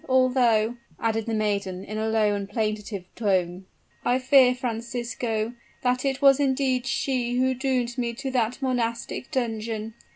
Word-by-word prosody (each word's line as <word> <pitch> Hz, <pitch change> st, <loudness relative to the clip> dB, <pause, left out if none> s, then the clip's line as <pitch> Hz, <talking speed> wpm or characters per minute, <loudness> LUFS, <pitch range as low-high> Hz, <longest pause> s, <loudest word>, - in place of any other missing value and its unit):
although," 250 Hz, -3 st, +3 dB, 0.2 s
added 225 Hz, -1 st, -1 dB
the 230 Hz, -, -1 dB
maiden 200 Hz, -3 st, -1 dB
in 215 Hz, -, -6 dB
a 220 Hz, 0 st, 0 dB
low 215 Hz, -2 st, +2 dB
and 200 Hz, -1 st, -3 dB
plaintive 210 Hz, -3 st, -2 dB
tone, 185 Hz, -4 st, 0 dB, 0.4 s
"I 245 Hz, -, +2 dB
fear, 260 Hz, -1 st, +5 dB
Francisco, 235 Hz, -2 st, -3 dB, 0.3 s
that 250 Hz, 0 st, +1 dB
it 270 Hz, 0 st, -1 dB
was 275 Hz, 0 st, +7 dB
indeed 265 Hz, -2 st, +1 dB
she 250 Hz, -3 st, 0 dB
who 260 Hz, +1 st, +3 dB
doomed 255 Hz, -2 st, -1 dB
me 235 Hz, -1 st, -1 dB
to 270 Hz, +2 st, -4 dB
that 245 Hz, -1 st, 0 dB
monastic 240 Hz, -1 st, -2 dB
dungeon. 225 Hz, -4 st, -2 dB
235 Hz, 150 wpm, -25 LUFS, 215-255 Hz, 0.4 s, was